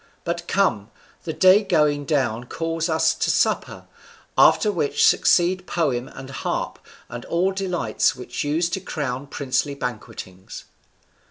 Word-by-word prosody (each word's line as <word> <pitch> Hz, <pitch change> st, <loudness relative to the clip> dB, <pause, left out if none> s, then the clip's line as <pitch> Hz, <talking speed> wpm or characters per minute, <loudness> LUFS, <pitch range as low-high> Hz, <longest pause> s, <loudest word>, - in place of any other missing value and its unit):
But 170 Hz, 0 st, -4 dB
come, 115 Hz, -, +1 dB, 0.4 s
the 165 Hz, -, -2 dB
day 190 Hz, +5 st, +5 dB
going 150 Hz, -6 st, +1 dB
down 125 Hz, -6 st, 0 dB
calls 165 Hz, +4 st, -3 dB
us 160 Hz, 0 st, +2 dB
to -, -, -2 dB
supper, -, -, 0 dB, 0.5 s
after 210 Hz, -, +5 dB
which 165 Hz, -7 st, +1 dB
succeed 185 Hz, +1 st, +3 dB
poem 135 Hz, -7 st, -1 dB
and 135 Hz, 0 st, -10 dB
harp, -, -, -3 dB, 0.3 s
and 120 Hz, 0 st, -8 dB
all 180 Hz, +3 st, +1 dB
delights 180 Hz, -, 0 dB
which 125 Hz, -1 st, -5 dB
use 155 Hz, +4 st, 0 dB
to 190 Hz, -, -1 dB
crown 140 Hz, -7 st, -4 dB
princely 140 Hz, +1 st, -2 dB
banquetings." 105 Hz, -7 st, -7 dB
150 Hz, 135 wpm, -23 LUFS, 125-175 Hz, 0.5 s, day